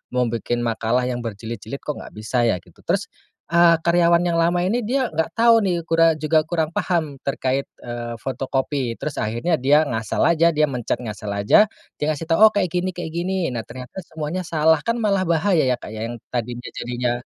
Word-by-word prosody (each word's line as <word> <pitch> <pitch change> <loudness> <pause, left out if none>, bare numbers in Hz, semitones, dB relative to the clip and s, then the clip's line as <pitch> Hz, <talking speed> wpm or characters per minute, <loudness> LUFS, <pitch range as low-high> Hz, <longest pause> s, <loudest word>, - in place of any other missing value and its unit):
mau 125 - +3
bikin 120 +1 -2
makalah 115 +1 0
yang 125 -1 -2
berjilid-jilid, 115 +3 -6
kok, 150 - -4
enggak - - -11
bisa, 120 +3 0
ya?" 115 - +2
Gitu. 90 - -22
Terus, - - 0 0.4
eee, 170 0 +6
karyawan 170 0 +4
yang 170 -1 +1
lama 175 +1 +2
ini, 205 +7 +1
dia 245 0 -1
enggak 160 +1 0
tahu, 230 0 +6
nih, 180 -5 0
kura 165 0 +3
juga 155 +1 +2
kurang 160 -2 -1
paham, 160 -6 -1
terkait, 135 0 -1 0.2
eee, 120 -1 -5
fotokopi. 130 0 -2
Terus, 150 - -5
akhirnya, 120 +10 0
dia 145 +4 +4
ngasal 115 -7 -1
aja, 170 0 +4
dia 155 - +3
mencet 125 -5 -2
ngasal 105 -2 -6
aja, 100 - +5 0.3
dia - - 0
ngasih 155 +1 -2
tahu, 165 - +3
oh, - - +1
kayak 185 -4 +1
gini 180 +2 0
kayak 170 -2 -5
gini. 175 -1 -1
Nah, 120 -2 -3
ternyata 125 +8 -8
semuanya 160 +2 -4
salah. 160 0 +3
Kan, 230 0 +1
malah 195 -3 +1
bahaya, 165 -3 +2
ya, 125 - +2
Kak, 120 - -10
ya. 110 +1 -4
Yang 120 -1 -8
tadinya 120 0 -4
jadinya 120 0 -2
150 Hz, 200 wpm, -22 LUFS, 120-170 Hz, 0.4 s, eee